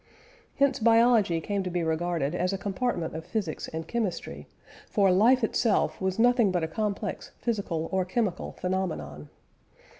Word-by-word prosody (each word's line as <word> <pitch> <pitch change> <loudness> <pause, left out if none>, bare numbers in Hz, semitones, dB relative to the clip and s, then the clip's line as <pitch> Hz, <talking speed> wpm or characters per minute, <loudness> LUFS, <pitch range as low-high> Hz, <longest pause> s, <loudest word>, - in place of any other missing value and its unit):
Hence 275 -1 +2
biology 225 -6 +4
came 200 +4 -2
to 185 - -3
be 175 -1 -1
regarded 160 -2 -1
as 180 +1 0
a 195 - -2
compartment 195 -4 -2
of 160 - -5
physics 195 -7 -3
and 160 0 -6
chemistry, 225 -6 -3 0.4
for 200 -3 +3
life 235 +7 +4
itself 220 -2 +1
was 190 0 -1
nothing 240 -2 +4
but 175 -2 0
a - - 0
complex 205 +3 -3
physical 195 -9 -2
or 190 -1 +1
chemical 190 0 -2
phenomenon. 155 - -3
190 Hz, 150 wpm, -27 LUFS, 170-225 Hz, 0.4 s, biology